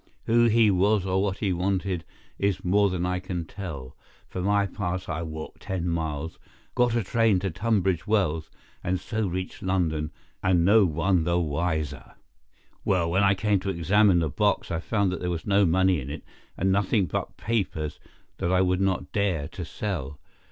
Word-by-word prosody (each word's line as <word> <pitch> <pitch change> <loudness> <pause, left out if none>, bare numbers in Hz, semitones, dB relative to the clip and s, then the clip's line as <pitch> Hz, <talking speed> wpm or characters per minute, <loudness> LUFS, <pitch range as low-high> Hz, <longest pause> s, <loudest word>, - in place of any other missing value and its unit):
Who 120 +1 +4
he 115 -2 +5
was 100 +1 +2
or 95 0 +1
what 100 -1 -1
he 100 -4 0
wanted 90 -1 -1 0.3
is 100 -2 0
more 100 +3 +4
than 90 -1 -1
I 90 0 0
can 90 -2 -4
tell. 80 -9 -7 0.3
For 90 - -5
my 100 +1 +2
part 95 -1 -3
I 80 -1 -3
walked 80 -1 -7
ten 90 -2 -3
miles, 80 -2 -3 0.3
got 120 -1 +2
a 115 - +1
train 110 -1 +2
at 95 -4 -1
Tunbridge 95 -4 0
Wells, 85 -7 +1 0.3
and 90 -1 0
so 110 +2 -2
reached 90 +1 -4
London, 80 -5 0 0.3
and 90 -2 +3
no 105 +1 +6
one 85 +2 +1
the 85 +2 +1
wiser. 80 -2 -2 0.7
"Well, 85 -4 +1
when 95 +3 +3
I 100 0 +4
came 105 0 +1
to 95 - -4
examine 95 +2 +3
the 80 -2 +1
box - - 0
I 85 - -1
found 100 +1 0
there 90 0 -3
was 85 -2 -3
no 100 -2 +4
money 95 -1 +3
in 65 - -7
it, 75 +2 -6 0.3
and 95 +2 +1
nothing 100 +1 +2
but 80 - -4
papers 90 -9 -2 0.4
that 85 - -1
I 95 - +4
would 90 0 +2
not 95 -2 0
dare 90 -8 0
to 90 - -6
sell. 80 -7 -4
95 Hz, 180 wpm, -26 LUFS, 85-100 Hz, 0.7 s, no